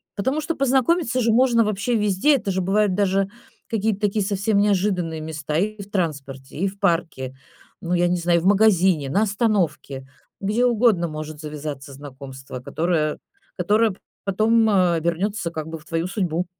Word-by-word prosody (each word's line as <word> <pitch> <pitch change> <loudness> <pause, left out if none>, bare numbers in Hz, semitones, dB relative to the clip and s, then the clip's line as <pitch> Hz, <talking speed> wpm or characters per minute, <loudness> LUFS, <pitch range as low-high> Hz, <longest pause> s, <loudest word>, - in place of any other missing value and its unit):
Потому 265 +9 -1
что 320 +2 -3
познакомиться 270 0 +2
же 230 0 +2
можно 235 -1 +4
вообще 215 +3 -1
везде. 210 +7 +3
Это 205 -7 -2
же 190 - -1
бывают 200 +1 +2
даже 195 0 +1 0.4
какие-то 215 -2 -1
такие 205 -1 +1
совсем 200 +1 0
неожиданные 185 -5 0
места: 155 -1 -4
и 210 +3 -1
в 200 - -11
транспорте, 140 -8 -4
и 190 +5 0
в 195 +1 -7
парке, 165 -8 -1 0.5
ну, 175 +1 -2
я 175 0 +3
не 180 - +1
знаю, 170 0 +2
и - - -5
в - - -4
магазине, 190 -7 +3
на 200 +9 +2
остановке. 195 - -1 0.4
Где 215 +5 +1
угодно 225 -7 +3
может 155 -1 -7
завязаться 150 -3 -7
знакомство, 135 -2 -9
которое 155 +2 -1 0.4
которое 220 +1 +2
п 185 - -13 0.3
потом, 220 +3 +3
э, 185 -4 +3
обернётся 170 +3 -1
как 155 -2 -5
бы 160 0 -6
в 150 - -20
твою 165 +1 -2
судьбу. 180 -3 -1
190 Hz, 170 wpm, -22 LUFS, 160-215 Hz, 0.5 s, можно